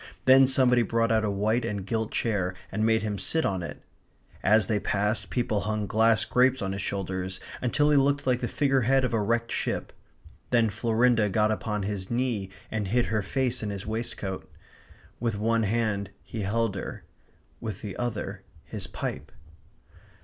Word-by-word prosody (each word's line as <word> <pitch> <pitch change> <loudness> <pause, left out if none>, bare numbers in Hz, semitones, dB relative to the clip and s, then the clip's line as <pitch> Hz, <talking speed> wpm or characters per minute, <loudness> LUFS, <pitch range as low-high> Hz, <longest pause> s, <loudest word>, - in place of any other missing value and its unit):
Then 130 0 +7
somebody 130 -2 +4
brought 115 0 +1
out 110 -1 +3
a 105 - +1
white 105 +4 +1
and 100 -4 -3
gilt 110 +1 -1
chair 95 -5 0 0.2
and 110 +2 -1
made 110 -1 +3
him 105 -2 -2
sit 160 - +1
on 95 -2 0
it. 85 - -7 0.6
As 110 +1 +4
they 105 +1 0
passed, 105 +2 -1
people 120 -4 0
hung 105 +1 -2
glass 110 0 +3
grapes 130 +2 +3
on 95 -2 -2
his 100 0 -3
shoulders, 95 -1 -3 0.2
until 145 +4 +2
he 145 - +5
looked 140 +1 +2
like 125 -1 +2
the 120 - -2
figure 135 -1 +2
head 130 +2 +3
of 125 - -2
a 110 - +2
wrecked 115 +2 0
ship. - - -2 0.6
Then 115 -3 +3
Florinda 115 0 +2
got 105 +2 +2
upon 105 -1 -2
his 100 -1 -3
knee 120 -5 -1 0.2
and 110 -2 -2
hid 120 +5 +2
her 110 - +2
face 125 +4 0
in 105 - -3
his 100 -1 -5
waistcoat. 110 -3 -4 0.7
With 115 -3 -1
one 115 +2 +1
hand 105 -3 0
he 110 - -6
held 110 +2 0
her; 95 - -6 0.6
with 110 -5 -6
the 100 -3 -5
other, 105 -5 -3 0.2
his - - -5
pipe. - - -5
110 Hz, 180 wpm, -27 LUFS, 100-120 Hz, 0.7 s, Then